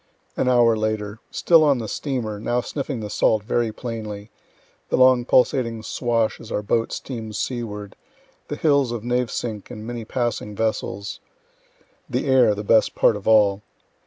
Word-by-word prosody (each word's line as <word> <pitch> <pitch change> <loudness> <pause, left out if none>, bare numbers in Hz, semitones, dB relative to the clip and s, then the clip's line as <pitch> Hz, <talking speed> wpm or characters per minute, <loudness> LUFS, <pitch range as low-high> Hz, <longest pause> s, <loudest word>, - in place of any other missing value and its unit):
An 130 - +1
hour 120 -2 +5
later 110 -1 -2
Still 165 -2 +4
on 145 -3 +4
the 115 -2 -4
steamer, 115 -6 -3
now 120 +3 0
sniffing 135 -2 -4
the 105 - -5
salt 110 -2 +2
very 115 +1 0
plainly 110 -3 -6 0.6
the - - +1
long 130 -1 +5
pulsating 120 -3 +2
swash 115 -1 -1
as 110 - -11
our 105 - -1
boat 115 +2 0
steams 110 -5 -6
seaward 105 -5 -4 0.5
the - - -4
hills 140 -5 +2
of 120 -3 -4
Navesink 120 -3 -2
and 110 -3 -8
many 120 0 -5
passing 115 -3 -3
vessels 105 -2 -3 0.9
the - - -1
air 130 -6 +4
the 105 - -5
best 110 +1 +3
part - - +4
of 105 - -8
all. 105 -2 +4
115 Hz, 160 wpm, -23 LUFS, 105-125 Hz, 0.9 s, hour